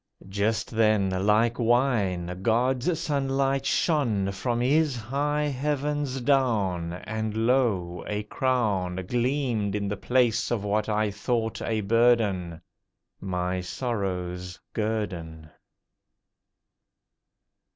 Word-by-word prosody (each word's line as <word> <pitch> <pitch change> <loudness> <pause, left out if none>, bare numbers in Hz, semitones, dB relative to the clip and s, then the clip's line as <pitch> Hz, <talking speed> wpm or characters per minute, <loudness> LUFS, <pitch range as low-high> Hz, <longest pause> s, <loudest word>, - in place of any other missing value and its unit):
Just 100 +3 -1
then, 110 -4 +2 0.2
like 115 +3 +3
wine, 105 -8 +1
God's 125 - +1
sunlight 135 -3 0
shone 115 - +1
from 120 +5 -2
His 145 +3 +2
high 140 +6 -1
Heavens 145 -1 -1
down; 105 -11 +1
And 110 +3 -3
lo! 105 -9 +1
a 105 0 -2
crown 105 -7 -1
Gleamed 120 -4 0
in 100 -1 -1
the 105 - -2
place 125 -2 +1
of 115 -4 -1
what 105 +1 0
I 105 0 +1
thought 110 +2 -2
a 110 -1 -1
burden— 105 -6 +2 0.6
My 90 -1 -2
sorrow's 90 -4 -3
guerdon. 90 -8 -3
110 Hz, 100 wpm, -26 LUFS, 95-130 Hz, 0.6 s, like